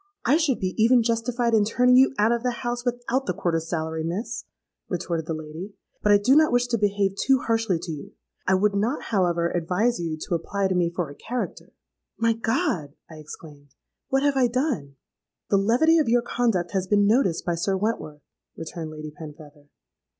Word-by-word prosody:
—'I 280 Hz, +5 st, +4 dB
should 310 Hz, -7 st, +1 dB
be 185 Hz, -1 st, -2 dB
even 240 Hz, +1 st, +5 dB
justified 235 Hz, +1 st, 0 dB
in 215 Hz, -2 st, +5 dB
turning 250 Hz, +4 st, +3 dB
you 260 Hz, +1 st, +6 dB
out 215 Hz, +2 st, +3 dB
of 235 Hz, -1 st, 0 dB
the 245 Hz, 0 st, -3 dB
house, 240 Hz, 0 st, -2 dB
without 245 Hz, +2 st, -2 dB
the 180 Hz, -, -1 dB
quarter's 165 Hz, -2 st, -1 dB
salary, 160 Hz, -1 st, -2 dB
Miss,' 210 Hz, +9 st, -4 dB, 0.4 s
retorted 170 Hz, -3 st, -3 dB
the 165 Hz, -, -2 dB
lady: 160 Hz, +6 st, -8 dB, 0.3 s
'but 210 Hz, -, +3 dB
I 205 Hz, -, +7 dB
do 235 Hz, +7 st, +3 dB
not 310 Hz, -2 st, +5 dB
wish 245 Hz, 0 st, +3 dB
to 235 Hz, -, +1 dB
behave 200 Hz, -1 st, +1 dB
too 270 Hz, +6 st, +3 dB
harshly 225 Hz, -5 st, +1 dB
to 165 Hz, +1 st, -6 dB
you; 150 Hz, -2 st, -8 dB, 0.3 s
I 190 Hz, -, +4 dB
would 200 Hz, +2 st, +2 dB
not, 220 Hz, +8 st, 0 dB
however, 175 Hz, -4 st, +1 dB
advise 180 Hz, +8 st, 0 dB
you 165 Hz, -2 st, -3 dB
to -, -, -4 dB
apply 195 Hz, +3 st, -1 dB
to -, -, +1 dB
me 175 Hz, -2 st, +1 dB
for 170 Hz, -3 st, -4 dB
a -, -, -9 dB
character.'—'My 230 Hz, 0 st, -4 dB
God!' 220 Hz, -, -1 dB, 0.2 s
I 160 Hz, -, -10 dB
exclaimed; 145 Hz, -2 st, -12 dB, 0.3 s
'what 270 Hz, 0 st, +1 dB
have 285 Hz, -1 st, +2 dB
I 255 Hz, -2 st, +4 dB
done?'—'The 220 Hz, -, -4 dB
levity 250 Hz, +12 st, +4 dB
of 295 Hz, -, +1 dB
your 240 Hz, 0 st, +3 dB
conduct 230 Hz, -8 st, 0 dB
has 190 Hz, -2 st, -1 dB
been 205 Hz, +1 st, +3 dB
noticed 210 Hz, -6 st, +2 dB
by 175 Hz, -, 0 dB
Sir 190 Hz, +3 st, -1 dB
Wentworth,' 185 Hz, -8 st, -3 dB, 0.3 s
returned 165 Hz, 0 st, -6 dB
Lady 155 Hz, 0 st, -8 dB
Penfeather. 150 Hz, -1 st, -12 dB
200 Hz, 190 wpm, -24 LUFS, 165-240 Hz, 0.4 s, I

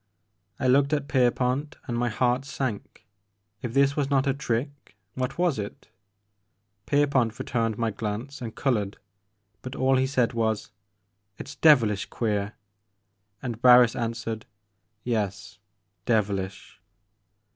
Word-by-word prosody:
I -, -, -2 dB
looked 140 Hz, +3 st, +4 dB
at 145 Hz, -2 st, 0 dB
Pierpont, 130 Hz, +2 st, +1 dB
and 120 Hz, -, -3 dB
my 120 Hz, 0 st, 0 dB
heart 125 Hz, +4 st, +1 dB
sank. 125 Hz, -5 st, -5 dB, 0.6 s
If 120 Hz, 0 st, -5 dB
this 140 Hz, 0 st, +4 dB
was 140 Hz, -2 st, 0 dB
not 135 Hz, -1 st, +2 dB
a 135 Hz, -, +2 dB
trick, 140 Hz, -2 st, -4 dB, 0.2 s
what 130 Hz, 0 st, -3 dB
was 175 Hz, -9 st, +1 dB
it? 100 Hz, 0 st, -7 dB, 1.0 s
Pierpont 135 Hz, -6 st, +2 dB
re 130 Hz, -, -5 dB
turned 115 Hz, -3 st, -1 dB
my 115 Hz, -1 st, 0 dB
glance 115 Hz, +7 st, -5 dB
and 115 Hz, -2 st, -6 dB
colored, 105 Hz, -7 st, -1 dB, 0.6 s
but 130 Hz, +3 st, -7 dB
all 130 Hz, 0 st, +3 dB
he 130 Hz, 0 st, +2 dB
said 130 Hz, -3 st, +1 dB
was, 110 Hz, -2 st, -1 dB, 0.7 s
"It's 140 Hz, -, -8 dB
devilish 115 Hz, -11 st, +4 dB
queer," 105 Hz, -2 st, -2 dB, 0.9 s
and 120 Hz, -3 st, -4 dB
Barris 125 Hz, -2 st, +7 dB
an 115 Hz, -1 st, -1 dB
swered, 115 Hz, -2 st, -5 dB, 0.3 s
'* 105 Hz, +1 st, -49 dB
Yes, 105 Hz, -4 st, -3 dB, 0.5 s
devilish." 100 Hz, -4 st, -1 dB
120 Hz, 135 wpm, -26 LUFS, 110-135 Hz, 1.0 s, Barris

